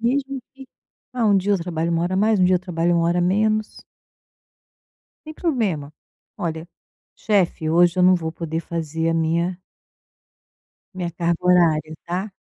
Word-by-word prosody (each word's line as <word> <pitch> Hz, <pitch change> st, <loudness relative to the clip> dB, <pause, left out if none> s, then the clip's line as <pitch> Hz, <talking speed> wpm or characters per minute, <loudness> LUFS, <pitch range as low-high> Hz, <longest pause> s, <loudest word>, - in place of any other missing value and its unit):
Mesmo 270 Hz, +3 st, -1 dB
que, 270 Hz, 0 st, -12 dB, 0.5 s
ah, 240 Hz, -3 st, 0 dB
um 205 Hz, -2 st, +4 dB
dia 195 Hz, +2 st, +1 dB
eu 200 Hz, -, +2 dB
trabalho 165 Hz, -1 st, -2 dB
1 165 Hz, 0 st, +1 dB
hora 180 Hz, +2 st, -1 dB
a -, -, 0 dB
mais, 215 Hz, +2 st, +3 dB
um -, -, +5 dB
dia 185 Hz, 0 st, +4 dB
eu -, -, -1 dB
trabalho 175 Hz, -1 st, -1 dB
1 165 Hz, 0 st, +2 dB
hora 170 Hz, +1 st, +1 dB
a -, -, +2 dB
menos. 215 Hz, +4 st, 0 dB, 1.4 s
Sem 310 Hz, -, -7 dB
problema, 215 Hz, -, -1 dB, 0.5 s
olha, 165 Hz, -3 st, -4 dB, 0.5 s
chefe, 185 Hz, -6 st, 0 dB
hoje 170 Hz, +2 st, +3 dB
eu 180 Hz, -, +4 dB
não 185 Hz, +1 st, +6 dB
vou 165 Hz, -3 st, -2 dB
poder 165 Hz, -1 st, -4 dB
fazer 165 Hz, -1 st, -3 dB
a -, -, 0 dB
minha 170 Hz, +2 st, 0 dB, 1.3 s
Minha 180 Hz, -2 st, -4 dB
carga 170 Hz, 0 st, -1 dB
horária, 165 Hz, -4 st, +3 dB
tá, 185 Hz, +4 st, -3 dB
175 Hz, 170 wpm, -22 LUFS, 165-200 Hz, 1.4 s, não